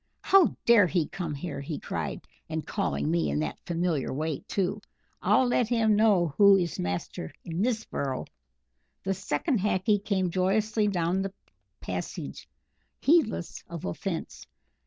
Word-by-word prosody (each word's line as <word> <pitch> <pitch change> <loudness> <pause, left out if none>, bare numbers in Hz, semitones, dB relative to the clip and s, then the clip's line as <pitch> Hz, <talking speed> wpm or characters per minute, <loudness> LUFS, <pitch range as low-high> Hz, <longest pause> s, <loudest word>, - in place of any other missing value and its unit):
"How 385 -4 +5
dare 230 -5 +7
he 170 -2 0
come 170 -5 -4
here!" 145 -1 -5
he 145 +1 -4
cried, - - -4 0.2
"and - - -3
calling 70 +2 -1
me 80 -3 +1
in 70 - -1
that 75 -2 -3
familiar 170 -4 0
way 155 +1 -2
too! 200 +2 -1 0.4
I'll 260 - +4
let 245 -1 +2
him 225 -2 +3
know 200 -8 +3
who 200 -1 +8
is 175 -3 -2
master 90 -2 -3
in 170 +1 -3
this 225 -1 0
burrow!" 135 -2 -3 0.8
The 195 - 0
second 215 - -1
Hackee 200 +1 +1
came 190 -4 0
joyously 210 +4 +1
down 180 -1 +1
the 195 0 -4 0.5
passage, - - -5 0.5
heedless 275 - +2
of 170 -2 -6
offence. 85 - -4
185 Hz, 145 wpm, -28 LUFS, 155-210 Hz, 0.8 s, who